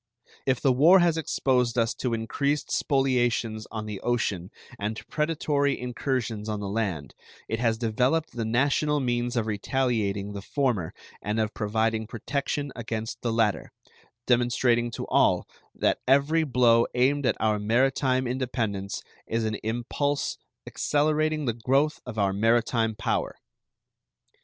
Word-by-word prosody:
If 130 -2 +2
the 135 - +4
war 160 +9 +7
has 175 -3 +3
exposed 125 -6 0
us 115 0 +2
to 120 -3 -2
increased 140 +6 -1
spoliations 120 -5 +1
on 110 -1 -5
the 105 -2 -5
ocean 100 -7 -1 0.3
and 105 +2 -3
to - - -9
predatory 150 -2 0
incursions 120 -3 -3
on 105 -1 -2
the 100 - -4
land, 95 -8 -2 0.3
it 115 - -2
has 115 -2 +1
developed 125 +8 0
the 120 - -3
national 140 +6 +1
means 120 -1 -1
of 115 - +1
retaliating 105 -3 -1
the 100 - -6
former 120 - -1 0.3
and 105 +2 -2
of 110 -1 -1
providing 110 +1 0
protection 140 +4 -3
against 115 -1 -5
the 120 - -1
latter, 115 -3 0 0.5
demonstrating 120 -1 +2
to 115 - -5
all - - +2 0.3
that - - +1
every 140 +5 +3
blow 120 -3 +4
aimed 135 +2 +2
at - - +1
our 110 -1 +1
maritime 130 +4 +2
independence 115 -6 -2 0.2
is 115 0 -1
an 110 - -1
impulse 120 +6 -2 0.3
accelerating 155 +1 0
the 120 - 0
growth 135 +7 +1
of 120 -3 -7
our 100 -2 +2
maritime 115 +1 +2
power. - - -1
120 Hz, 140 wpm, -26 LUFS, 110-135 Hz, 0.5 s, war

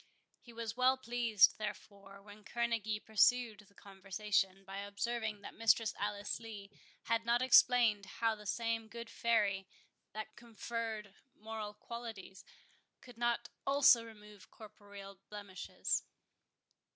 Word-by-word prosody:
He 240 - -15
was 230 -1 -5
well 255 +1 +4
pleased, 235 -6 +3
therefore, 200 -2 -7
when 205 +1 -14
Kerneguy 225 -1 -2
pursued 225 0 +3
the 200 - -25
conversation, 195 0 -2
by 195 +1 -6
observing 210 +1 -3
that - - -9
Mistress 225 -1 +3
Alice 205 +1 -2
Lee 210 -3 -9 0.3
had 230 0 0
not 235 +2 +2
explained 235 -5 +5
how 225 +2 0
the 210 -1 -10
same 230 0 -1
good 235 +1 -8
fairy 200 -5 +1 0.5
that 215 +1 -6
conferred 225 -2 -5 0.2
moral 215 -1 -6
qualities, 225 -6 -8 0.6
could 245 -2 -15
not 240 0 0
also 275 -4 +6
remove 210 -3 -14
corporeal 200 -2 -12
blemishes. 205 -2 -3
215 Hz, 120 wpm, -35 LUFS, 205-235 Hz, 0.6 s, also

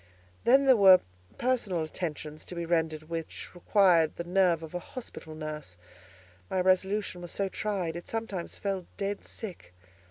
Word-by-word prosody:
Then 270 +3 +6
there 265 -1 +7
were 190 -4 +8 0.4
personal 235 -9 0
attentions 155 -2 -5
to 180 - -7
be 170 0 -3
rendered 160 -2 0
which 165 0 -6
required 175 -3 +4
the 170 - -4
nerve 175 -2 +2
of 160 - -9
a 180 - -2
hospital 175 -7 -9
nurse; 155 - -6 0.7
my 185 - 0
resolution 190 +1 +1
was 175 - -7
so 195 +3 -1
tried, 185 -5 -2
it 175 - -7
sometimes 220 -6 -4
fell 195 -3 -3
dead 200 0 -2
sick. 130 - -8
180 Hz, 155 wpm, -29 LUFS, 160-200 Hz, 0.7 s, were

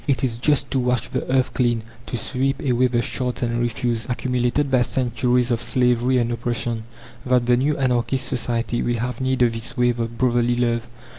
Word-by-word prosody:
It 135 -2 +1
is 115 -3 -1
just 140 0 +1
to 135 - +1
wash 125 -2 0
the - - -3
earth 130 -1 +2
clean, 120 -3 +1 0.2
to 120 - -3
sweep 135 +4 -1
away 130 -2 +3
the 120 -1 0
shards 125 +2 -2
and 120 0 0
refuse, 120 -1 -1
accumulated 125 +2 0
by 130 -2 +4
centuries 125 0 +1
of 115 -1 0
slavery 125 +1 +2
and 120 -1 +1
oppression, 120 -1 -2 0.4
that 125 -1 +2
the 125 0 +4
new 145 +4 +1
anarchist 130 0 0
society 120 -1 -1
will 120 0 0
have 125 +3 -3
need 130 -1 +2
of 120 -1 +2
this 115 +3 -5
wave 120 -1 +2
of 115 0 -3
brotherly 120 -1 +2
love. 120 -1 0
125 Hz, 195 wpm, -22 LUFS, 120-130 Hz, 0.4 s, by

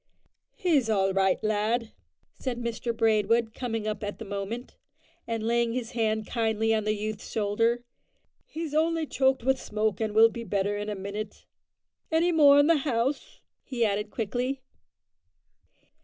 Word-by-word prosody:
"He's 295 -10 +2
all 195 -3 +2
right, 190 -1 +3
lad," 215 +2 0 0.4
said 255 -3 -4
Mr 235 0 -3
Braidwood, 225 0 +2
coming 225 -4 -3
up 210 -1 -3
at 205 0 -4
that 225 - -8
moment, 200 +5 -5 0.5
and 225 -1 -2
laying 235 0 +1
his 245 -2 -3
hand 220 -2 0
kindly 225 -1 0
on 215 -1 0
the 215 0 +1
youth's 215 0 -5
shoulder; 230 +3 +1 0.6
"he's 320 -2 -5
only 325 +1 +1
choked 265 -3 +1
with 265 +1 +1
smoke, 215 -2 -1
and 215 -1 -2
will 225 +1 +8
be 230 +1 -7
better 200 0 -1
in 205 +1 -4
a 210 - -3
minute. 200 +2 -6 0.7
Any 330 +2 +3
more 290 -4 +7
in 285 - +6
the 330 +1 +4
house?" 265 -1 -2 0.2
he 240 -4 0
added 210 0 -1
quickly. 250 +5 -2
225 Hz, 155 wpm, -27 LUFS, 210-250 Hz, 0.7 s, will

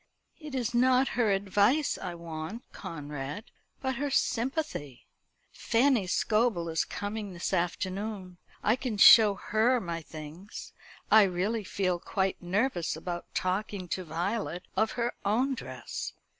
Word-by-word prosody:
"It 300 -4 -7
is 240 -2 -1
not 255 +2 +4
her 235 -3 +1
advice 205 +9 +2
I 180 -3 -5
want, 170 +6 -6
Conrad; 150 +3 -6 0.4
but 265 -2 -1
her 285 +2 -1
sympathy. 250 - -1 0.5
Fanny 235 -4 +2
Scobel 210 -3 +1
is 160 0 0
coming 205 -1 -5
this 175 +2 -3
afternoon. 185 +1 -2 0.2
I 215 - +4
can 250 -5 -3
show 210 0 +9
her 225 +6 +2
my 170 -5 -4
things. 160 +5 -9 0.4
I 220 - +9
really 200 +4 0
feel 185 -2 -1
quite 190 +1 -1
nervous 185 - 0
about 175 +2 -6
talking 190 0 -2
to 185 - -2
Violet 180 +2 -3
of 220 +3 +1
her 240 0 -1
own 245 +7 +2
dress. 130 - -6
200 Hz, 130 wpm, -29 LUFS, 175-235 Hz, 0.5 s, show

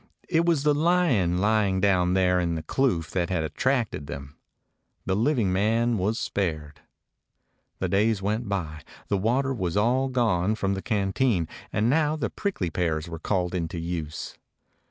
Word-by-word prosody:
It 165 -1 +2
was 160 -5 +2
the 150 0 +4
lion 145 - +2
lying 100 -1 +2
down 90 -2 +2
there 90 -1 +3
in 85 -1 0
the 80 - -4
kloof 85 - 0
that 90 -2 -1
had 90 -4 0
attracted 105 - -1
them. 70 0 -8 0.7
The 95 - 0
living 115 -4 +1
man 115 +3 +1
was 105 +5 0
spared. 80 -10 -3 1.0
The - - -1
days 105 +2 +2
went 105 +3 -2
by. 80 -6 -3 0.3
The 100 - +2
water 130 +6 +1
was 90 -7 -2
all 125 +5 +2
gone 110 -6 +1
from 100 -2 -1
the 95 - -3
canteen, 100 -3 0 0.2
and 110 - +1
now 150 +3 +2
the 140 -7 -3
prickly 145 - -2
pears 80 -1 -1
were 80 -1 -7
called 90 0 -1
into 85 -1 -3
use. 80 -2 -5
100 Hz, 160 wpm, -26 LUFS, 85-120 Hz, 1.0 s, the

